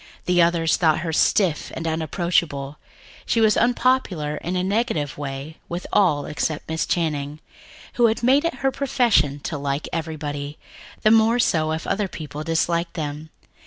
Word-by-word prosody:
The 180 -1 +3
others 170 -1 +2
thought 160 -2 +2
her 165 -1 -3
stiff 170 -1 +2
and 165 - -4
unapproachable; 160 -3 -1 0.5
she 230 - +2
was 220 -1 +4
unpopular 235 - +1
in 180 +2 -4
a 180 - 0
negative 195 - -1
way 140 +2 -6
with 175 +2 -4
all 155 -8 +3
except 150 0 -3
Miss 160 0 -2
Channing, 150 -3 -1 0.5
who 235 -2 +4
made 270 +5 +4
it 275 -6 -3
a 270 - +3
profession 225 - +2
to 150 0 -4
like 140 +1 -2
everybody, 150 -3 -4 0.5
the 215 - +5
more 225 +1 +5
so 155 -9 +2
if 160 0 -3
other 205 -1 0
people 150 -3 -7
disliked 170 +1 0
them. 155 -1 -5
165 Hz, 155 wpm, -23 LUFS, 150-200 Hz, 0.5 s, the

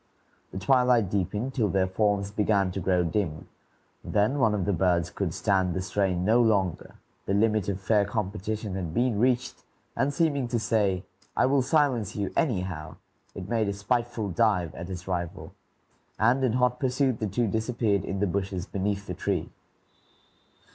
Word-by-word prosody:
The - - -7
twilight 125 -1 +3
deepened 105 +6 -1
till 115 -7 +1
their 95 -1 +2
forms 100 +1 0
began 100 -2 +1
to 95 - -4
grow 90 0 +2
dim; 80 -3 -2 0.6
then 110 +7 +1
one 110 -5 +3
of 95 -4 -1
the 100 - +1
birds 90 -1 +1
could 95 -5 -2
stand 95 -1 +1
the 95 - -1
strain 95 -2 0
no 115 +4 +4
longer, 100 -6 0 0.3
the 100 - +1
limit 105 -2 +2
of 95 -1 -2
fair 105 +2 +2
competition 105 0 -3
had 90 -3 -4
been 120 -4 +1
reached, 125 +1 0 0.3
and 135 +1 +1
seeming 145 -4 +1
to 120 0 -1
say, 105 -4 +1 0.3
"I - - +4
will 135 +1 +3
silence 135 -5 +1
you, 100 -2 -3
anyhow," 90 - -1 0.4
it 95 -1 -6
made 110 -2 0
a - - -1
spiteful 115 +1 -1
dive 90 -5 +1
at 85 +2 -7
its 90 -1 -7
rival, 85 -3 -4 0.6
and 120 +5 +3
in 125 -4 +2
hot 125 0 +1
pursuit 130 -1 +1
the 110 - -1
two 110 +5 0
disappeared 110 -1 0
in 95 - -3
the - - +3
bushes 95 -1 -2
beneath 100 +1 -2
the 90 - -5
tree. 90 -2 -2
100 Hz, 170 wpm, -27 LUFS, 95-120 Hz, 0.6 s, no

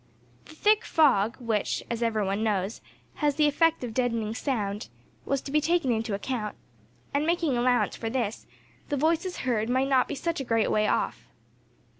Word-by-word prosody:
The 310 - -14
thick 425 +5 +3
fog, 235 -9 +3
which, 225 -5 -1
as 235 0 -3
every 220 -3 +1
one 200 +3 -1
knows, 205 -1 -1 0.4
has 295 -2 +1
the 305 0 +4
effect 325 0 +2
of 235 -3 -4
deadening 230 -3 0
sound, 215 -5 -2 0.4
was 275 -1 0
to 275 - -7
be 305 +1 +3
taken 330 -4 +1
into 225 -2 -1
account; 210 0 -3 0.6
and, 285 +1 +1
making 330 -4 +1
allowance 245 -3 +2
for 225 - -3
this, 225 -3 -3 0.4
the 290 - 0
voices 335 +5 +1
heard 225 -3 0
might 260 +2 +1
not 260 -2 +3
be - - -4
such 335 +3 -2
a - - -2
great 230 -3 +1
way 215 0 +2
off. - - -1
245 Hz, 180 wpm, -27 LUFS, 220-295 Hz, 0.6 s, the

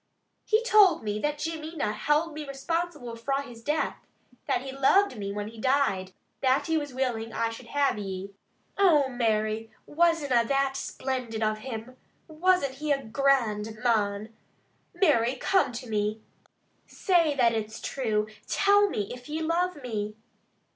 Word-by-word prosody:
"He 435 +1 +3
told 405 - +5
me 210 0 -2
that 295 +4 -1
Jimmy 320 +1 -5
na 210 -9 -1
held 300 +8 +1
me 305 0 -5
responsible 295 -3 -3
fra 275 +4 -1
his 240 -4 -12
death. 300 +6 -1 0.5
That - - 0
he 270 - -6
loved 275 +6 +3
me 200 -2 -4
when 205 +1 -4
he 225 0 -13
died. 235 -9 +1 0.3
That 265 0 +2
he 325 - 0
was 290 -3 -1
willing 245 -3 -2
I 230 0 0
should 225 - -10
have 280 -6 +1
ye! 195 0 -5 0.5
Oh, 305 -9 +5
Mary, 220 -2 0 0.2
wasna 295 -7 +2
that 275 +2 0
splendid 250 -5 -3
of 215 0 0
him. 250 +1 -7 0.3
Wasna 345 -1 +2
he 290 +3 -4
a 275 -1 +1
grand 225 -4 +1
mon? 215 -2 0 0.6
Mary, 260 - +3
come 375 +2 +2
to 245 +2 -6
me. 215 0 -1 0.6
Say 335 -6 +2
that 240 -4 +3
it's 220 0 -3
true! 215 -6 -1 0.2
Tell 405 0 +4
me, 205 - -3
if 245 +2 -11
ye 315 +2 -2
love 335 -2 -1
me." 215 -3 -3
260 Hz, 155 wpm, -27 LUFS, 220-305 Hz, 0.6 s, told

